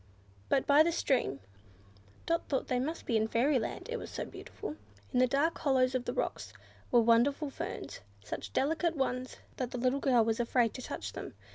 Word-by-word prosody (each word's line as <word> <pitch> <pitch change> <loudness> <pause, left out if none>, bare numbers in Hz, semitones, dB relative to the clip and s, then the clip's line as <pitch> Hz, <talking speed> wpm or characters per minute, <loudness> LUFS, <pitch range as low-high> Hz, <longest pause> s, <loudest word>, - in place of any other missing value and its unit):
But, 265 - +2
by 285 +1 +6
the 335 +2 +4
stream, 250 - 0 0.8
Dot 335 0 0
thought 270 - -1
they 250 - +1
must 310 +6 -3
be 235 - 0
in 220 0 +1
fairyland; 245 +2 0
it 480 0 -3
was - - -7
so - - -4
beautiful. 415 -8 -8 0.4
In 250 - +3
the 255 - +5
dark 285 +6 +2
hollows 260 -3 +3
of 255 -1 -1
the 245 - -2
rocks - - -3 0.4
were 240 - +5
wonderful 250 +6 +3
ferns; - - -6 0.2
such 105 -1 -6
delicate 325 - +1
ones 255 -1 -2 0.2
that 255 -2 -2
the 250 - -5
little 255 +3 +1
girl 245 -5 +4
was 225 0 0
afraid 240 -1 +2
to 255 - -7
touch - - -5
them. - - -7
255 Hz, 190 wpm, -32 LUFS, 240-285 Hz, 0.8 s, by